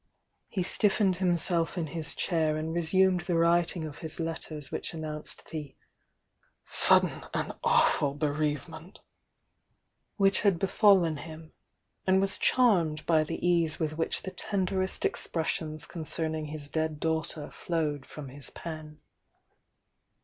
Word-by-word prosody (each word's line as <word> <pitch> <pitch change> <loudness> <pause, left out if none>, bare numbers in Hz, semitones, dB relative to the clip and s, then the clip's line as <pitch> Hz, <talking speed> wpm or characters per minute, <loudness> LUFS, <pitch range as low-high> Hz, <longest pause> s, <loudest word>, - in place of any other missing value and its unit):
He 185 - -2
stiffened 195 0 +2
himself 175 -1 +1
in 170 - 0
his 155 +1 -5
chair 160 -3 +1
and 160 +1 -3
resumed 180 +2 +3
the 175 - -1
writing 170 0 +2
of 150 -1 -8
his 160 0 -2
letters 160 -3 -5
which - - -4
announced 155 -1 -6
the 150 -4 -6 0.9
"sud - - +5
den - - -4
and - - -1
awful 140 -1 +3
bereavement" 155 +4 -3 1.1
which 195 -2 +3
had 200 -4 +3
befallen 190 -3 +4
him, 160 +1 -10 0.5
and 190 0 +5
was 195 0 0
charmed 170 -12 +3
by 160 -2 +4
the 155 - -3
ease 170 -3 +2
with 155 -2 -1
which 165 +1 -1
the 190 - -5
tenderest 190 0 -1
expressions 155 -2 -1
concerning 160 -1 -3
his 150 -1 -6
dead 160 0 -2
daughter 160 -1 -2
flowed 155 -5 -2
from 140 0 -9
his 140 +2 +1
pen. 155 -2 -8
160 Hz, 130 wpm, -29 LUFS, 155-180 Hz, 1.1 s, sud